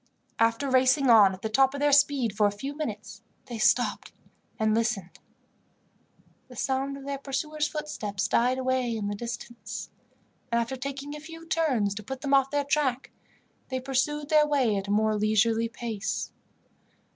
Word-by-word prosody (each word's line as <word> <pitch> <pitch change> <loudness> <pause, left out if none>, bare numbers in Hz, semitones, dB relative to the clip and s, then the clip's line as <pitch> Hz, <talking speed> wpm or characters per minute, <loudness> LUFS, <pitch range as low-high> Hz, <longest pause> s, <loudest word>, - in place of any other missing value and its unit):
After 230 +4 +2
racing 260 0 +4
on 210 -4 +7
at 190 0 -9
the - - 0
top 270 +4 +3
of - - -4
their 290 0 +3
speed 280 -6 +3
for 210 0 +4
a - - 0
few 270 +8 -6
minutes, 225 -7 -6 0.2
they 240 -3 -7
stopped - - +1 0.5
and 220 0 +2
listened. 220 -5 -1 1.3
The 250 - -13
sound 270 +3 -1
of 275 - -11
their 280 -1 -4
pursuers' 300 +2 -2
footsteps 225 -10 -3
died 250 +2 +2
away 255 -3 0
in 205 -2 -3
the - - -2
distance; 235 +1 -7 0.6
and, 235 - +2
after 235 +3 -2
taking 275 +2 -6
a - - -7
few 330 +2 -11
turns 270 -12 +1
to 205 - -6
put 265 +5 -6
them 280 -1 -1
off 270 -1 +4
their 290 0 0
track, 280 -3 0 0.6
they 260 -1 -2
pursued 275 +3 -1
their 305 -1 +5
way 265 -8 +2
at 195 0 -3
a - - -2
more 215 +1 +2
leisurely 220 +2 +2
pace. 225 -3 -4
255 Hz, 170 wpm, -27 LUFS, 220-280 Hz, 1.3 s, on